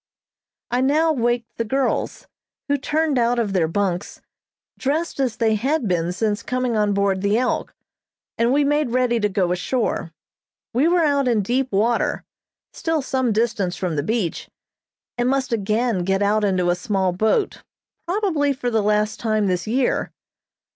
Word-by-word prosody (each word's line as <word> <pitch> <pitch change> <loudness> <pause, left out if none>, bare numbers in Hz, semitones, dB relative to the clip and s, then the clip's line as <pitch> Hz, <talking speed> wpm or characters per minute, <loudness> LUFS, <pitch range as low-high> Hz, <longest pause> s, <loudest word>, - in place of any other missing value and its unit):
I 245 +1 +1
now 310 +4 +3
waked 240 -2 -1
the - - +2
girls, 265 +4 -1 0.4
who 285 - +2
turned 295 0 0
out 240 +1 +2
of 215 -4 0
their 175 -4 +2
bunks, 185 +1 -2 0.6
dressed 300 +4 -1
as 255 -5 0
they 225 -1 +2
had 260 +4 0
been 175 -2 0
since 210 +3 -1
coming 250 -1 -1
on 210 -1 +1
board 200 -1 +1
the 200 +2 +2
"Elk," 250 +1 -1 0.6
and 235 +1 +2
we 290 +2 +3
made 295 -1 +1
ready 245 -1 +1
to 210 -1 +1
go 185 -2 0
ashore. 180 -1 -1 0.6
We 265 +7 +3
were 345 0 +3
out 280 -3 +2
in 225 -4 +2
deep 255 +5 0
water, 225 +4 +1 0.5
still 325 -3 -1
some 260 -3 0
distance 210 -5 0
from 180 -4 -2
the 145 - 0
beach, 195 0 -2 0.7
and 245 +1 +2
must 265 -2 0
again 215 -1 0
get 195 +2 +1
out 210 +1 +2
into 185 -3 +2
a - - +1
small 190 -1 0
boat, 220 - 0 0.5
probably 345 -7 +1
for 245 -2 -3
the 220 -1 +2
last 210 +1 +1
time 215 -2 +1
this 180 -1 -1
year. 250 +3 0
230 Hz, 165 wpm, -22 LUFS, 200-265 Hz, 0.7 s, now